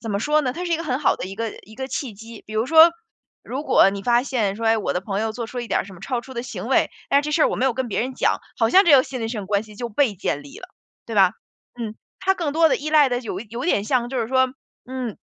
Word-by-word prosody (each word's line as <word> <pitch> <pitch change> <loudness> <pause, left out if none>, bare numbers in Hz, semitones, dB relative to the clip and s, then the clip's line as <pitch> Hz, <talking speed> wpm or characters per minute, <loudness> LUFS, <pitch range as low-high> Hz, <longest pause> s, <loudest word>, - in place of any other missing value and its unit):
怎 225 - -5
么 200 - 0
说 300 +7 +2
呢， 255 -4 -2
它 355 - -4
是 345 - -2
一 - - +3
个 330 - -5
很 260 -4 -1
好 295 - +2
的 - - -5
一 195 - -7
个 225 +2 -3
一 220 - -15
个 265 +2 -5
契 260 -4 -4
机。 225 +2 -12
比 215 - -9
如 220 +1 +1
说， 320 +4 +7 0.5
如 270 +4 -5
果 195 - +5
你 200 0 -6
发 240 +2 +3
现 220 -7 -1
说： 230 - -5
“哎， 225 0 +4
我 210 - -2
的 180 - -1
朋 195 0 -2
友 220 0 -1
做 235 0 -5
出 245 +2 -5
一 240 - -5
点 - - +1
儿 - - -5
什 195 - -12
么 180 - -13
超 240 +3 -3
出 260 - -11
的 235 -2 -4
行 - - -6
为， - - +2 0.2
但 280 - +5
是 - - -5
这 - - -2
事 310 - +3
儿 - - +5
我 - - -2
没 260 - +1
有 255 - +1
跟 260 -1 -2
别 210 - -1
人 255 +3 -3
讲。 - - +1 0.2
“好 225 -1 +2
像 385 +7 +7
这 325 - +6
个 260 - +5
信任 250 -4 -5
上 220 -3 -4
关 200 +1 0
系 215 -1 -14
就 240 +2 -4
被 225 0 +1
建 145 -5 -2
立 145 - -12
了， 370 - -11 0.4
对 230 - -6
吧， 190 -2 +5 0.5
嗯， 220 -3 -4 0.3
它 380 0 +3
更 330 -6 -2
多 325 0 +4
的 - - +3
依 300 - -5
赖 300 -3 +5
的 245 - 0
有 215 -6 -5
有 235 +4 -6
点 205 - +1
像 240 +1 0
就 260 0 -3
是 225 - -2
说， 260 0 +3 0.4
嗯， 255 -4 -5
240 Hz, 340 characters per minute, -22 LUFS, 215-270 Hz, 0.5 s, 说